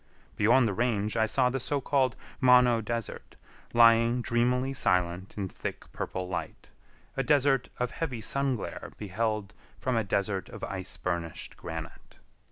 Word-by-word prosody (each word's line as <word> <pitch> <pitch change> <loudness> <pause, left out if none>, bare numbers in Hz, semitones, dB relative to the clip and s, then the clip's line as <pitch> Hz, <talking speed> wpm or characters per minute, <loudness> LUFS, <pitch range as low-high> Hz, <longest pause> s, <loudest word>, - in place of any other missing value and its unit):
Beyond 115 +4 +4
the 100 - -1
range 110 -2 0
I 110 -1 +3
saw 125 +3 +2
the 135 - -1
so 140 +3 -1
called 130 -2 +1 0.2
Mono 125 -3 +6
Desert, 115 0 -5 0.4
lying 115 +1 +5
dreamily 125 +3 +1
silent 90 -5 0
in 100 -2 -2
thick - - -7
purple 95 -1 -4
light—a 95 +7 -7
desert 135 -2 +3
of 125 -1 -1
heavy 140 -8 -3
sun 140 +4 +1
glare 110 - -7
beheld 105 0 -2 0.3
from 130 -1 -1
a 115 - +2
desert 100 -1 -1
of - - -10
ice 95 -1 -5
burnished 85 -3 -3
granite. 80 0 -8
115 Hz, 145 wpm, -29 LUFS, 100-125 Hz, 0.4 s, Mono